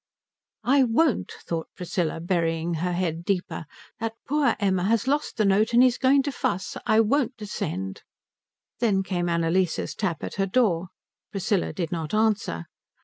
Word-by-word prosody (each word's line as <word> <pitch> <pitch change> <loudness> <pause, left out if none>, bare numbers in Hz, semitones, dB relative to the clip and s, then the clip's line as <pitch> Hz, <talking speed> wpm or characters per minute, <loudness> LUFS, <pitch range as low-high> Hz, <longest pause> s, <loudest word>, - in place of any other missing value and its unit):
"I 270 +4 +4
won't," 255 +3 +2
thought 165 -1 -3
Priscilla, 175 -2 -2
burying 165 -1 0
her 180 0 0
head 170 -2 -1
deeper. 180 -3 -2 0.3
"That 225 0 -3
poor 295 0 +2
Emma 190 -3 +1
has 230 +3 +2
lost 290 +2 0
the 215 - +3
note 205 +4 +3
and 240 +2 +7
he's 250 -1 +3
going 270 +1 +4
to 285 - -2
fuss. 185 -7 -2
I 220 - +5
won't 255 +3 +1
descend." 95 - -4 0.8
Then 205 -5 +2
came 175 -2 -1
Annalise's 170 +1 +1
tap 180 -7 -2
at - - -5
her 195 - +1
door. 185 -6 +2 0.4
Priscilla 195 -1 0
did 170 -4 -3
not 165 +2 -2
answer. 210 - +1
195 Hz, 155 wpm, -25 LUFS, 170-230 Hz, 0.8 s, and